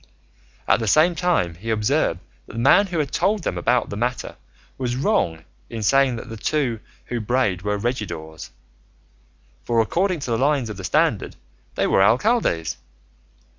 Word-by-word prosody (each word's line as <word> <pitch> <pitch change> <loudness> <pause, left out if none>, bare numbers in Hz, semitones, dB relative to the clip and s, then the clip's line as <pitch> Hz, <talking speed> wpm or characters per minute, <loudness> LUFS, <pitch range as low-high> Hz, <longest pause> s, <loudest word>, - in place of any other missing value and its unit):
At - - +4
the 110 - -3
same 155 - +4
time 170 - 0
he 100 +8 -8
observed 105 - +1 0.3
that - - -12
the - - -8
man 170 - +5
who 175 -2 -4
had 150 -3 -1
told 205 -2 +1
them - - -2
about 120 -2 +1
the - - -4
matter 120 +4 -3 0.4
was 125 -2 -1
wrong 125 - 0 0.3
in 115 -2 -5
saying 135 +2 +3
that 115 - -8
the 115 -1 -7
two 125 -1 -1 0.3
who 120 - -3
brayed 110 -5 0
were 105 +1 -1
regidors, 85 -9 -4 1.1
for 115 -1 +1
according 175 - +1
to 125 - -4
the 115 - +1
lines 135 -4 +1
of 105 - -8
the 95 - -8
standard 90 - +1 0.4
they - - +1
were - - +3
alcaldes. 115 - +2
120 Hz, 170 wpm, -22 LUFS, 105-145 Hz, 1.1 s, man